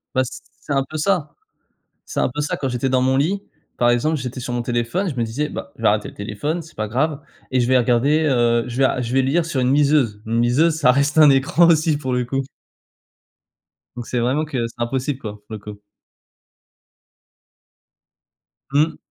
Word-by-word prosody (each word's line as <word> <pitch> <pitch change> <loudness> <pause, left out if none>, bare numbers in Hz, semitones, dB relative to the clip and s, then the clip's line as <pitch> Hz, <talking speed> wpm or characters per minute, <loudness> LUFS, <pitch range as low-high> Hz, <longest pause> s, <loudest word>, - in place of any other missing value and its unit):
Bah, 130 - +3
c 120 - -7 0.2
c'est 145 - -4
un 135 - +2
peu 155 - -5
ça, 165 -1 0 0.7
c'est - - -4
un - - +2
peu 150 - -2
ça 145 - -2
quand 135 - -2
j'étais 125 +1 -1
dans 130 0 +2
mon 130 +1 +2
lit, 190 +8 0 0.4
par 120 - +3
exemple, 150 +7 +1
j'étais 130 0 -5
sur 125 - -5
mon 120 - -1
téléphone 120 +11 -1
je 145 - -5
me 120 - 0
disais: 140 +7 -2
«Bah, 140 - -7
je - - -13
vais - - +3
arrêter 105 0 +1
le - - -16
téléphone 115 +12 -3
c'est 165 +2 -16
pas 110 -1 -3
grave 145 +6 -1 0.3
et 130 - +2
je 120 - +1
vais 130 - +4
regarder, 125 +6 +2
heu, 120 -2 +2
je 120 - -6
vais 135 - +4
a 130 - 0
je 120 0 -4
vais 135 - +4
lire 150 +6 +1
sur 145 -6 -1
une 125 +2 +2
liseuse». 140 -8 +2
Une 115 +1 0
liseuse 150 +7 +3
ça 145 -6 +4
reste 140 +3 +1
un 150 -2 +8
écran 140 +5 +4
aussi, 155 -2 +3
pour 130 -3 -3
le 125 0 0
coup. 135 +2 -1 1.5
Donc 120 -1 -7
c'est 125 - -1
vraiment 130 +6 0
que 125 -6 -2
c'est - - -15
impossible 130 +3 -2
quoi, 110 -6 -6
pour - - -19
le 110 - -5
coup. 105 0 -10 2.9
Mmh. 155 +2 +2
130 Hz, 215 wpm, -21 LUFS, 120-150 Hz, 2.9 s, un